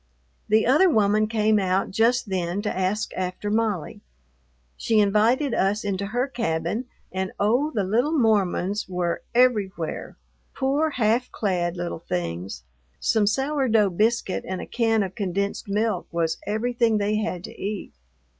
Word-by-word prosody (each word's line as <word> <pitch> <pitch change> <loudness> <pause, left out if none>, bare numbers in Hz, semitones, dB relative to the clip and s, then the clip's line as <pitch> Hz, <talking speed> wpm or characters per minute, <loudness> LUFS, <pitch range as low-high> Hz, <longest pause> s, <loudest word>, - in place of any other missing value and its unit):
The 220 +1 +4
other 305 +9 +5
woman 215 -4 +3
came 215 -1 +2
out 190 0 0
just 230 +4 +2
then 185 +1 -2
to 210 - -2
ask 190 +3 -1
after 185 +3 -3
Molly. 215 -7 -1 0.7
She 225 -2 +1
invited 225 +7 +3
us 200 +2 +1
into 200 -1 -2
her 245 +5 -1
cabin, 210 -2 -2 0.3
and, 190 0 -3
oh, 245 +9 +2
the 220 -9 -1
little 235 +10 +1
Mormons 205 -4 +1
were 180 -2 -1
everywhere; 205 -9 +1 0.4
poor, 285 +4 +1
half 240 -2 +1
clad 180 -4 -1
little 175 -1 -4
things! 85 - -4 0.4
Some 215 -2 +2
sour 270 +5 +1
dough 215 -4 +3
biscuit 215 +1 0
and 185 -1 -3
a - - -5
can 225 -3 +1
of 190 -1 -5
condensed 200 +1 -2
milk 215 +3 0
was 165 -1 -1
everything 230 +1 +1
they 210 +1 0
had 185 -5 -3
to - - -9
eat. 205 0 -4
210 Hz, 145 wpm, -24 LUFS, 185-230 Hz, 0.7 s, other